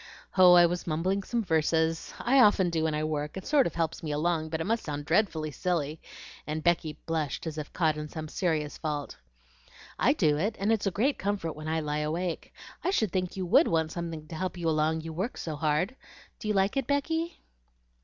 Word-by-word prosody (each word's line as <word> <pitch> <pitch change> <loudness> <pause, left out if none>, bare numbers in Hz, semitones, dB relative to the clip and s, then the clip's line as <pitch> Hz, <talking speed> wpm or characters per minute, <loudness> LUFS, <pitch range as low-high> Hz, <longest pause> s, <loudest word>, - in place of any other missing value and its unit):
"Oh, 185 -1 +8
I 175 -1 +8
was 175 +1 -2
mumbling 180 +5 0
some 230 +4 -2
verses. 160 -1 +1
I 265 +3 +3
often 205 -6 +5
do 160 -1 0
when 155 -1 0
I 155 - -1
work, 150 +1 -2
it 190 - -7
sort 290 -3 +4
of 170 - -7
helps 165 -1 -1
me 155 - -4
along; 160 +1 0
but 160 0 -2
it - - -1
must 225 +6 0
sound 145 -1 -4
dreadfully 160 -3 +1
silly," 160 -2 -2 0.5
and 155 +1 -3
Becky 165 -3 +1
blushed 160 -2 -2
as 155 -1 -4
if 150 - -6
caught 155 -3 +1
in 150 0 -5
some 155 0 -6
serious 155 -3 -1
fault. 150 -3 -4 0.8
"I - - +4
do 150 -1 +2
it, 210 +6 0
and 200 +3 +1
it's 210 -2 0
a - - +4
great 240 +10 0
comfort 195 -5 -2
when 155 +1 -8
I 160 0 0
lie 150 0 -2
awake. 165 +3 -3 0.3
I - - +1
should 220 - +1
think 185 -1 -2
you 185 - -2
WOULD 175 - +5
want 160 -1 +1
something 165 -3 -5
to 165 - -6
help 185 +2 -3
you 170 -1 -2
along, 160 0 +1
you 160 0 -7
work 190 +10 -3
so 160 -2 -4
hard. 155 - 0 0.4
Do 215 - -6
you 210 - +1
like 195 +6 +2
it, 270 -3 0
Becky?" 320 +4 -1
165 Hz, 220 wpm, -28 LUFS, 155-190 Hz, 0.8 s, Oh